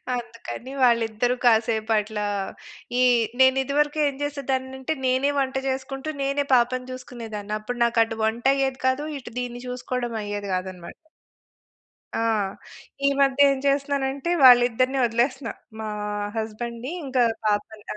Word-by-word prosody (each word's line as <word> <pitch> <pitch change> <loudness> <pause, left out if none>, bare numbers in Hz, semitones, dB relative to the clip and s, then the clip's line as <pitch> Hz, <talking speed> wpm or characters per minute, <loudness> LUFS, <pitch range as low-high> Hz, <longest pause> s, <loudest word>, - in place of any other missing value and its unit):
అందుకని 240 +1 -7
వాళ్ళిద్దరూ 235 0 +2
కాసేపట్లా 220 -2 +2 0.7
ఈ - - +4 0.4
నేను 260 0 +6
ఇదివరకు 295 +3 0
ఏం 280 - -2
చేసేదాన్ని 265 -2 -2
అంటే 290 +4 -2
నేనే 260 +3 +2
వంట 265 -1 -1
చేసుకుంటూ, 270 +2 -3
నేనే 275 +1 0
పాపని 250 +1 +1
చూసుకునేదాన్ని. 225 -5 -7
అప్పుడు 240 +3 -5
నాకు 235 -1 +1
అటు 225 0 -5
వంట 225 +3 -1
అయ్యేది 270 -1 -1
కాదు. 270 +3 +1
ఇటు 240 -2 -11
దీన్ని 245 -1 -5
చూసుకోవడం 250 -1 -3
అయ్యేది 205 -1 -4
కాదన్నమాట. 185 -2 -6 1.3
ఆ! - - 0 0.9
ఈ - - +6
మధ్య 275 0 +3
ఏం 275 - 0
చేస్తున్నానంటే 280 +2 0
వాళ్ళిద్దరిని 250 +1 +6
వదిలేస్తున్నా. 245 +3 0 0.3
మా 220 - -4 0.5
హస్బెండ్‌ని, 235 +4 -4
ఇంక 265 -2 -4 0.3
పాపని. 210 0 -1
250 Hz, 125 wpm, -24 LUFS, 225-270 Hz, 1.3 s, నేను